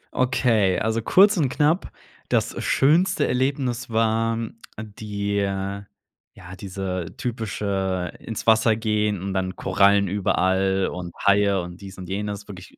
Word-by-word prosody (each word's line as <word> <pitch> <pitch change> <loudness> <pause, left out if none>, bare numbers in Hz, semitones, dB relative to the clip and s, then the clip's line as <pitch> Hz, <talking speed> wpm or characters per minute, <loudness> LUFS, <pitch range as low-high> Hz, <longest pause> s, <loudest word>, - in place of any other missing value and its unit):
Okay, 115 -7 +2
also 110 +1 0
kurz 200 - +5
und 140 -6 +2
knapp. 155 +6 +1 0.4
Das - - 0
schönste 160 +8 +3
Erlebnis 130 -1 -1
war 115 0 +1 0.4
die 100 -1 -4
äh, 100 0 -2 0.5
ja, 90 +1 -11
diese 95 -2 -5
typische 100 -6 -2
ins 115 - -6
Wasser 110 0 +4
gehen 105 -3 0
und 95 -1 -3
dann 95 -1 -2
Korallen 100 +1 +3
überall 95 0 +1
und 90 -1 -7
Haie 100 -1 +4
und 90 +2 -9
dies 95 -1 -10
und 90 -2 -8
jenes, 105 +1 -4
wirklich 95 -3 -11
100 Hz, 130 wpm, -23 LUFS, 95-115 Hz, 0.5 s, kurz